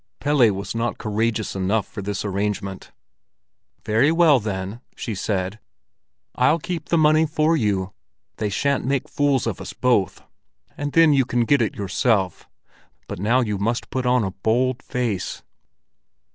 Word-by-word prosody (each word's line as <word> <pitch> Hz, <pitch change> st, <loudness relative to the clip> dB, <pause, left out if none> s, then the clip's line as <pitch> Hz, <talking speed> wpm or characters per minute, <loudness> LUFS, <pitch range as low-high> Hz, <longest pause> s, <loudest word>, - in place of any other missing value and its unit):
Pelle 140 Hz, -6 st, +4 dB
was 100 Hz, +1 st, -5 dB
not 115 Hz, 0 st, -2 dB
courageous 110 Hz, 0 st, -1 dB
enough 95 Hz, +2 st, 0 dB
for 100 Hz, -, -7 dB
this 100 Hz, +1 st, -3 dB
arrangement. 100 Hz, 0 st, -3 dB, 0.9 s
"Very 115 Hz, +8 st, +3 dB
well, 165 Hz, -5 st, +5 dB
then," 100 Hz, +1 st, -5 dB
she 115 Hz, -, -4 dB
said. 95 Hz, +1 st, -2 dB, 0.7 s
"I'll 125 Hz, +6 st, +3 dB
keep 165 Hz, -1 st, -5 dB
the 170 Hz, -, +3 dB
money 155 Hz, 0 st, +4 dB
for 155 Hz, +2 st, +2 dB
you. 100 Hz, -8 st, -1 dB, 0.4 s
They 105 Hz, -2 st, -1 dB
shan't 140 Hz, +7 st, 0 dB
make 135 Hz, 0 st, -1 dB
fools 140 Hz, -4 st, +1 dB
of 115 Hz, -5 st, -3 dB
us -, -, -7 dB
both. 120 Hz, -7 st, +1 dB, 0.5 s
And 145 Hz, -1 st, -4 dB
then 165 Hz, -2 st, +6 dB
you 135 Hz, -1 st, +4 dB
can 120 Hz, -1 st, 0 dB
get 140 Hz, +3 st, +3 dB
it 110 Hz, -, -1 dB
yourself. 100 Hz, 0 st, 0 dB, 0.6 s
But -, -, -6 dB
now 115 Hz, +6 st, +2 dB
you 105 Hz, -4 st, -2 dB
must 115 Hz, +4 st, -2 dB
put 130 Hz, -1 st, -1 dB
on 125 Hz, -1 st, +3 dB
a 95 Hz, -, -2 dB
bold 120 Hz, +6 st, 0 dB
face." 115 Hz, -7 st, -3 dB
115 Hz, 155 wpm, -22 LUFS, 100-140 Hz, 0.9 s, then